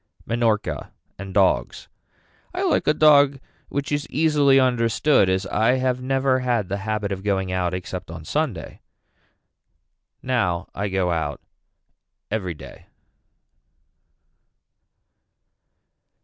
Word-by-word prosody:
Minorca 110 - -1 0.3
and 95 0 -7
dogs. 95 -1 +1 0.7
I - - -1
like - - +1
a 150 - +5
dog 145 -3 +5 0.3
which 140 +1 -3
is 145 0 -2
easily 145 -3 +3
understood 125 -2 +2
as 95 +1 0
I 110 +5 +2
have 130 -1 0
never 130 0 +1
had 120 -6 -1
the 100 - -2
habit 105 0 -3
of 95 -1 -4
going 95 -2 -1
out 90 -1 -1
except 90 -1 -6
on 80 -1 -9
Sunday. 125 - -3 1.4
Now 95 -9 -1
I 100 +2 -2
go 95 -2 0
out 80 -4 -2 0.9
every 95 -6 -2
day. - - -13
110 Hz, 110 wpm, -23 LUFS, 95-130 Hz, 1.4 s, a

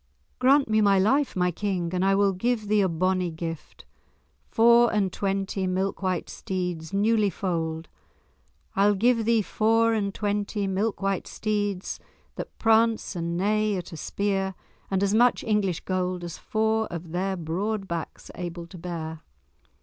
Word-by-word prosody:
"Grant 270 +2 +4
me 215 0 +3
my 200 -2 +4
life, 265 +9 +2
my 180 -1 +2
King, 180 -2 -2
and 180 0 0
I 195 0 +3
will 200 0 +3
give 220 +3 -1
thee 210 0 +3
a 190 - +2
bonnie 185 +2 0
gift—four 225 +8 0
and 200 -4 0
twenty 195 -1 -1
milk 190 +2 -1
white 185 -3 -1
steeds, 180 -4 -4
newly 210 +1 +2
foaled—I'll 165 - -3
give 230 +2 +2
thee 230 -1 +3
four 225 +3 +2
and 200 -3 0
twenty 205 0 -2
milk 195 +2 -1
white 195 -1 -1
steeds 205 -3 -2 0.3
that - - -8
prance 225 -2 +2
and 170 0 -2
neigh 210 +2 +1
at 180 +1 -7
a 165 - -7
spear, 195 +1 -1 0.3
and 195 0 +1
as 200 0 +1
much 240 +3 +4
English 205 -5 0
gold 185 -1 -2
as 170 -1 -6
four 220 0 0
of 170 -1 -7
their 190 +2 -1
broad 195 +5 -2
backs 170 -2 -6
are - - -10
able 175 -1 -5
to 170 +1 -12
bear." 160 -2 -5
195 Hz, 155 wpm, -26 LUFS, 180-215 Hz, 0.3 s, Grant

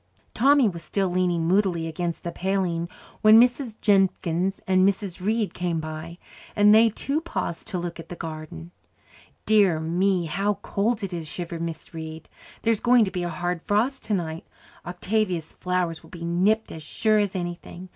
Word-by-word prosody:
Tommy 275 +1 +5
was 170 -4 -4
still 195 -2 -1
leaning 175 -2 +1
moodily 180 -3 +2
against 170 +1 -4
the 170 - -3
paling 180 -3 -1 0.3
when 220 +1 +8
Mrs. 245 -1 +2
Jenkins 190 -2 +1
and 185 -3 +3
Mrs. 190 -2 0
Reid 215 +1 0
came 175 -2 -2
by, 155 +2 -7 0.4
and 210 0 +6
they 225 +1 +6
too 280 +8 -2
paused 320 - -4
to 205 -4 -3
look 175 -1 -5
at 165 0 -10
the 175 - -6
garden. 155 - -8 0.7
"Dear 200 -7 +4
me, 175 +3 +1
how 195 +6 0
cold 220 +2 -1
it 190 -2 -4
is!" 165 -2 -4
shivered 170 +1 -5
Mrs. 165 0 -5
Reid. 160 0 -8 0.3
"There's 225 -2 +2
going 240 -2 +5
to 190 - -4
be 180 - -3
a 175 - -2
hard 175 -1 -3
frost 225 +8 0
tonight. 170 -6 -3 0.4
Octavia's 180 -2 -2
flowers 180 -3 -2
will - - -17
be 170 -2 -7
nipped 195 +6 +1
as 160 - -8
sure 215 +7 +1
as 205 -2 -1
anything. 175 0 -6
180 Hz, 170 wpm, -25 LUFS, 170-210 Hz, 0.7 s, when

